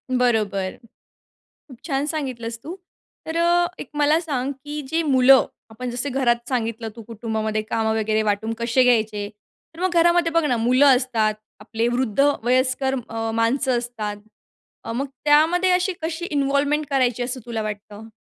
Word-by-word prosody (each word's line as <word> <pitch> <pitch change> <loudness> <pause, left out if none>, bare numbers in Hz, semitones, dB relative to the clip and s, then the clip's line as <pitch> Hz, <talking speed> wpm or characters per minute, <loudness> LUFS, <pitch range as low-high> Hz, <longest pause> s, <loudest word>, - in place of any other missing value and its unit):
बरोबर. 215 -6 0 0.9
खूप 255 - -13
छान 280 -2 -1
सांगितलंस 250 -7 -4
तू. 340 +4 -7 0.5
तर 320 +1 -4
अ, 345 +1 +3
एक - - -7
मला 295 +2 +3
सांग, 280 -5 -2
की 295 0 -5
जे 325 +4 0
मुलं, 265 -3 +5 0.2
आपण 245 +3 -6
जसं 245 +4 -3
घरात 240 -3 +1
सांगितलं, 230 -3 -2
तू 230 - -9
कुटुंबामध्ये 220 -1 -3
कामं 220 0 -1
वगैरे 215 0 +1
वाटून 215 +1 -1
कसे 235 +2 +2
घ्यायचे? 215 -4 +1 0.5
तर 335 - -11
मग 370 - +1
घरामध्ये 345 -1 +3
बघ 330 -2 +2
ना, 250 -5 +1
मुलं 255 +3 +5
असतात, 225 -5 0 0.3
आपले 225 +2 -2
वृद्ध, 245 0 0 0.2
वयस्कर 255 +2 +1
अ, 225 0 -3
माणसं 245 +3 +1
असतात. 225 -4 -5 0.7
अ, - - -4
मग 270 +5 -2 0.2
त्यामध्ये 325 +5 +4
अशी 365 +1 +1
कशी 325 +2 -3
इन्व्हॉल्वमेंट 285 +1 +1
करायची, 250 -3 +1
असं 255 +1 -3
तुला 225 -2 -3
वाटतं? 210 +1 -7
250 Hz, 155 wpm, -22 LUFS, 225-290 Hz, 0.9 s, मुलं